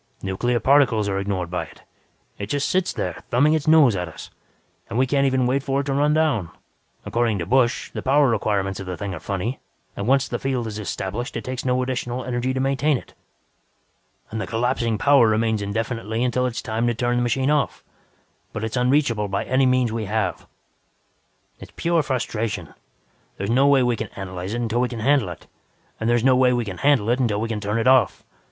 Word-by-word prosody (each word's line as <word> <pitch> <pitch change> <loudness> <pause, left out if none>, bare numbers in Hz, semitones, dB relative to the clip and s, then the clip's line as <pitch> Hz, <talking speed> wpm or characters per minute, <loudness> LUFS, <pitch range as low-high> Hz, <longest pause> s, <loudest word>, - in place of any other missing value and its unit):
Nuclear 120 +6 0
particles 125 -4 +3
are 95 -1 -1
ignored 95 -3 -3
by 90 - -2
it; - - -17 0.6
it 100 - -4
just 140 +5 -1
sits 185 -1 +1
there - - -4
thumbing 145 +6 +3
its 155 -2 -1
nose 155 -8 +6
at 90 -1 -3
us. 80 - -11 0.6
And 115 - -3
we 130 - +4
can't 140 +1 +2
even 130 -1 +1
wait 130 +3 +1
for 135 0 -1
it - - -5
to 135 0 -2
run 145 +2 +2
down. 140 - +1 0.6
According 115 -3 0
to 85 - -3
Busch, 125 +1 +1
the - - -5
power 140 +2 +3
requirements 100 -4 0
of 95 - -7
the 90 -1 -4
thing 100 -2 -4
are 85 - -6
funny 100 +9 -3 0.4
and 100 - -4
once 135 +1 +3
the - - -3
field 130 -3 -2
is 110 -1 -5
established, 105 +3 -4
it - - -5
takes 130 0 -5
no 125 0 +1
additional 125 -1 -3
energy 125 +1 -1
to 130 - -2
maintain 135 +2 +1
it. - - -13 1.2
And 110 0 -3
the - - -4
collapsing 115 -1 0
power 140 0 +5
remains 110 0 +1
indefinitely 110 +2 -2
until 125 0 +1
it 125 - -4
is - - -4
time 115 +1 -1
to 120 - 0
turn 120 +1 0
the - - +1
machine 130 +4 +1
off, 150 -3 0 0.7
but 105 - -4
it's 110 +2 -3
unreachable 125 -4 +2
by 100 0 -2
any 130 +1 +2
means 125 -2 +2
we 110 -1 -3
have. 105 -2 -2 1.1
"It's - - -12
pure 170 -1 +1
frustration. 115 - -3 0.6
There's 100 +3 -2
no 135 +4 +4
way 140 -2 +5
we 120 -1 +1
can 110 - -4
analyze 95 +1 -5
it 120 - -2
until 120 +1 0
we 125 - 0
can 115 -3 -6
handle 135 -5 +2
it, 85 - -10 0.5
and 115 +1 +1
no 130 -1 +5
way 125 -1 +4
we 120 -1 0
can 95 -3 -6
handle 140 -7 +3
it 125 - +1
until 110 -5 +1
we 115 - -1
can 110 -2 -2
turn 105 +2 -1
it 115 - 0
off. 130 -4 +3
120 Hz, 215 wpm, -22 LUFS, 105-130 Hz, 1.2 s, nose